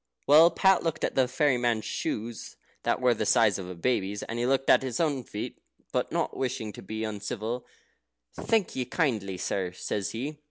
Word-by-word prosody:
Well, 155 +4 +8
Pat 190 +2 +4
looked 165 -2 -2
at - - 0
the 130 -1 +3
fairy 130 0 +2
man's 120 -3 0
shoes, 115 +1 -4 0.3
that - - 0
were 125 -1 +4
the 110 - -2
size 105 -4 +4
of 90 -1 -6
a 90 - -6
baby's, 100 0 -1
and 115 - -4
he 120 - +1
looked 135 0 +1
at - - +6
his 130 -3 -3
own 145 -6 +1
feet; 105 -2 -6 0.3
but - - -1
not - - -1
wishing 115 -5 -3
to - - -10
be 110 +3 -5
uncivil, 110 +3 -4 0.7
"Thank 220 -5 0
ye 130 - 0
kindly, 115 - -1
sir," 90 -1 -2
says 95 +2 -3
he. 145 +6 -5
120 Hz, 195 wpm, -28 LUFS, 105-135 Hz, 0.7 s, Well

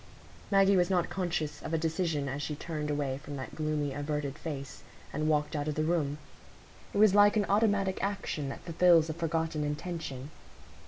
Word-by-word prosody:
Maggie 195 0 +5
was 175 0 +3
not 180 -3 +1
conscious 175 -5 -2
of 165 - -2
a - - +2
decision 160 -2 -1
as 140 +2 -3
she 150 - -3
turned 150 -1 -4
away 140 -2 -1
from 145 +1 -8
that 130 -1 -6
gloomy 150 -2 -1
averted 145 -1 -3
face, 140 -8 -6 0.3
and 155 0 0
walked 150 0 +1
out 145 0 -2
of 150 - -1
the 155 - 0
room; 155 -3 0 0.7
it - - -4
was 210 -2 +6
like 205 +1 +6
an 205 - +2
automatic 200 -2 +2
action 195 -8 -2
that - - -7
fulfils 170 -1 +4
a - - -4
forgotten 160 -1 -1
intention. 150 -2 -4
155 Hz, 180 wpm, -30 LUFS, 145-180 Hz, 0.7 s, was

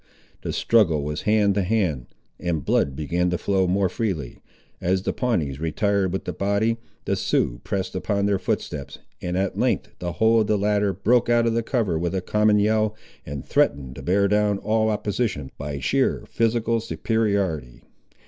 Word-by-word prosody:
The - - -3
struggle 85 -11 +3
was 75 +1 -3
hand 105 -2 +4
to 100 - +1
hand, 90 - 0 0.3
and 80 -5 -2
blood 70 -2 +1
began 85 +5 0
to 90 - 0
flow 95 0 +1
more 95 +2 +2
freely. 90 - -3 0.4
As 95 +1 +1
the - - -1
Pawnees 80 - -1
retired 95 +4 0
with 95 - -3
the - - -3
body, 100 +3 +1 0.3
the - - +1
Siouxes - - 0
pressed 95 -2 -3
upon 100 +2 -1
their 100 -2 +1
footsteps, 70 -5 -3 0.2
and 90 0 -2
at 95 0 -1
length - - +1
the 90 -1 -3
whole 110 +3 +4
of 105 - 0
the 105 - +2
latter 105 0 +1
broke 110 +6 +2
out 120 0 +4
of 115 - +2
the 115 - +1
cover 110 - 0
with 85 +2 -1
a 95 - 0
common 105 +2 +3
yell, 110 +1 +2 0.3
and 70 -1 -6
threatened 70 -3 +1
to 70 - -8
bear 100 +8 +2
down 105 0 +2
all 110 +2 +1
opposition 105 - -2
by 70 0 -4
sheer 130 - +1
physical 115 0 +1
superiority. 100 - -1
100 Hz, 175 wpm, -24 LUFS, 80-110 Hz, 0.4 s, hand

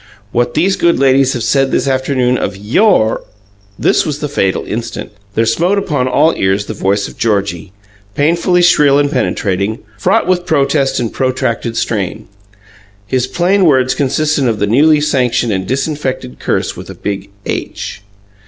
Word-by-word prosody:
What 120 0 0
these 190 +5 +2
good 170 0 +2
ladies 135 0 +3
have 120 - -3
said 135 +3 +2
this - - 0
afternoon 130 -1 +1
of 100 -5 -3
YOUR 110 - +2 0.3
" 100 0 -33
This - - +4
was 150 -3 -3
the 150 - -3
fatal 100 -10 -1
instant. 115 0 -5 0.2
There 115 - +2
smote 175 - +1
upon 150 -10 -1
all 150 +5 +3
ears 95 +2 0
the 110 - -5
voice 100 0 0
of - - -14
Georgie, 100 -4 -1 0.4
painfully 170 +4 +2
shrill 150 -5 +5
and 145 0 +1
penetrating 105 -5 -1 0.2
fraught 210 +5 +2
with 180 -1 0
protest 140 -2 +1
and 115 -3 -3
protracted, 130 -3 -1
strain. 105 0 -2 0.8
His 130 +3 -1
plain 185 +5 +2
words 130 -4 +3
consisted 145 0 0
of 115 -2 0
the 105 - 0
newly 150 +8 +4
sanctioned 125 -5 +1
and 95 -1 -3
disinfected 135 - -3
curse - - -1
with - - -10
a - - -8
big 100 0 -5 0.2
H. - - -5
130 Hz, 160 wpm, -14 LUFS, 110-150 Hz, 0.8 s, shrill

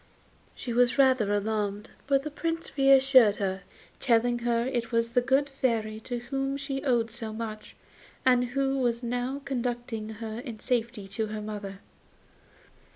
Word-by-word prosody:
She 240 - -5
was 245 +2 +3
rather 260 -6 +4
alarmed, 205 0 -1 0.2
but 275 -1 +3
the 305 - -5
Prince 330 0 -4
reassured 270 -5 +6
her, 195 -2 -2 0.4
telling 240 -1 +2
her 235 0 +1
it 245 -3 -2
was 230 0 +1
the 245 - +3
good 270 +3 +2
Fairy 230 -6 -1
to 245 +2 -4
whom 270 +3 -2
she 275 -1 -4
owed 235 -5 +1
so 225 -1 -6
much, 215 -1 -6 0.5
and 250 -1 +4
who 270 +2 0
was 240 -1 0
now 245 +3 -2
conducting 240 -4 -3
her 225 0 -5
in 240 -3 -7
safety 230 -4 -2
to 215 +3 -2
her 215 0 -5
mother. 205 -2 -6
240 Hz, 155 wpm, -28 LUFS, 220-270 Hz, 0.5 s, reassured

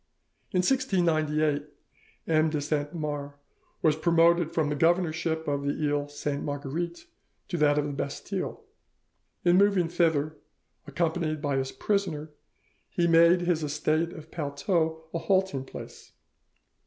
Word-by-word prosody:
"In 180 - +2
1698 155 - +1 0.6
M. 155 0 +3
de 155 -1 -1
Saint 145 0 -1
Mars 145 -3 -4 0.5
was 155 -2 +4
promoted 170 0 +3
from 155 -3 0
the 150 - -1
governorship 165 0 +1
of 140 -1 0
the 140 0 0
Iles 145 -1 -2
Sainte 145 -1 -2
Marguerite 150 +4 -4 0.4
to 175 - -2
that 150 -2 +3
of 150 - +1
the 145 - -3
Bastille. 140 0 -4 0.8
In 175 +1 +5
moving 200 -4 +4
thither, 160 -3 +1 0.5
accompanied 160 +1 -1
by 145 -2 -1
his 135 0 -1
prisoner, 170 -7 -1 0.6
he 175 - 0
made 170 +1 +6
his 175 -3 0
estate 155 +3 0
of 160 +1 -11
Palteau 160 +2 -1
a 165 - -1
halting 190 -7 +1
place. - - -11
155 Hz, 130 wpm, -28 LUFS, 145-170 Hz, 0.8 s, made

